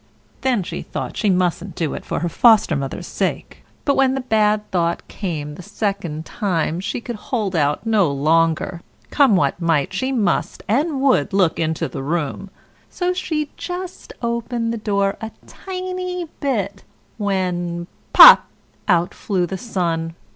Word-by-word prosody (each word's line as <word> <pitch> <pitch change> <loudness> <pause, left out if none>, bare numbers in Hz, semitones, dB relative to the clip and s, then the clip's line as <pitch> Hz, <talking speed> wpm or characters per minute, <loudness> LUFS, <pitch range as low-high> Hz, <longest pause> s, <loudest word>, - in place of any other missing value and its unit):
Then 250 -7 +1
she - - -5
thought - - -5
she 210 - +1
mustn't 180 -1 0
do 160 -4 -2
it - - -6
for - - -3
her 175 - 0
Foster 215 -2 +4
mother's 135 -1 -4
sake; - - -3 0.2
but 280 - +3
when 265 -1 +3
the 270 - -2
bad 215 -3 +1
thought 170 -2 0
came 155 -7 -4
the 165 - -10
second 180 -5 -3
time 175 -5 -1
she 195 - -3
could 235 -1 -6
hold 215 -8 -1
out 145 +4 +1
no 210 -8 +3
longer; 165 +4 +1 0.3
come 275 -8 +5
what 180 0 +1
might, 165 -2 +1
she 260 +8 -1
must 230 -6 0
and 275 +5 +1
would 270 -6 +2
look 185 -5 +2
into 160 -1 -1
the - - -6
room; 160 +5 -3 0.4
so 360 0 -1
she 310 -5 -2
just 360 0 -6
opened 235 0 -1
the - - -3
door 200 -2 0
a 220 - -4 0.2
tiny 365 -1 -5
bit, 220 -9 -2 0.4
when 180 -4 -1 0.3
POP! - - +10 0.4
out 175 -3 +2
flew 185 -4 -1
the 190 - -5
Sun. 170 -6 -2
195 Hz, 155 wpm, -20 LUFS, 170-240 Hz, 0.4 s, POP